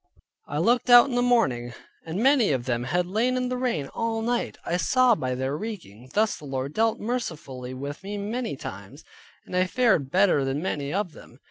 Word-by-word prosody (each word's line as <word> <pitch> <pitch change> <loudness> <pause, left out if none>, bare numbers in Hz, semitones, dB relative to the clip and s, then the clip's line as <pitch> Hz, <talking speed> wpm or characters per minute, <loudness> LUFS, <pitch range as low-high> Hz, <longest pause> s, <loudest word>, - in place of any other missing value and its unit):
I 145 - -4
looked 240 +10 +2
out 245 +2 +8
in - - -4
the 245 - +2
morning, 130 - +1 0.3
and 180 +7 -2
many 265 - +4
of 125 -2 -2
them 120 -1 -1
had 175 +7 0
lain 230 +7 0
in 250 0 -1
the 255 - -1
rain 245 - -1
all 225 -1 -2
night, 240 +1 -1
I 175 - 0
saw 255 +5 +4
by 130 - -2
their 130 +2 -2
reeking. 150 - -8
Thus 215 +1 +2
the 150 - -12
Lord 135 +1 -4
dealt 225 0 +1
mercifully 155 - -4
with 140 +2 -6
me 200 +2 -5
many 220 - -3
times, 100 +5 -9 0.4
and - - -7
I 185 0 +3
fared 220 - +2
better 185 -4 +3
than 135 +1 -1
many 145 -5 -3
of 195 0 -1
them. - - -15
185 Hz, 205 wpm, -25 LUFS, -, 0.4 s, out